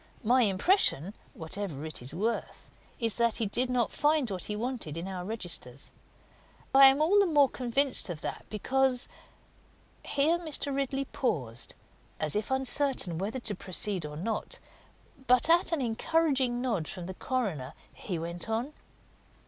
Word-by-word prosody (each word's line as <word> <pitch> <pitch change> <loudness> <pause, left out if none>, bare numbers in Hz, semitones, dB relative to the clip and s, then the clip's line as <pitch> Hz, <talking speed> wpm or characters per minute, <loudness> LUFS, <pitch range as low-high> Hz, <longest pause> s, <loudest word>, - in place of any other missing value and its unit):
My 250 +3 +4
impression 200 - +2 0.2
whatever 160 -3 -5
it 155 -4 -5
is 125 - -5
worth 215 +9 -3 0.3
is 230 -3 0
that 235 -2 +2
he 230 - 0
did 245 +5 0
not 245 -2 +1
find 295 -6 +1
what 185 -2 -4
he 210 - -2
wanted 225 - -4
in 170 +3 -4
our 185 -2 -5
registers. 175 - -5 0.8
I 270 0 +9
am 275 +3 +4
all 395 +6 +4
the 400 - +4
more 290 -4 +5
convinced 255 -1 0
of 165 -4 -5
that - - -6
because 255 +4 +1 0.5
" - - -33
Here 320 +5 +3
Mr. 310 -4 -3
Ridley 275 0 -1
paused, 125 - -3 0.4
as 155 -1 0
if 210 0 -1
uncertain 265 - +2
whether 215 +7 -3
to 220 - 0
proceed 190 -1 +1
or 150 0 -7
not; 225 - -3 0.7
but 250 +6 +5
at 345 0 +4
an 325 -4 0
encouraging 260 0 +1
nod 220 - -1
from 180 -2 -6
the 190 - -6
coroner 185 - -3 0.2
he 180 -5 -5
went 170 +4 -5
on. 235 +7 -2
230 Hz, 155 wpm, -29 LUFS, 180-270 Hz, 0.8 s, I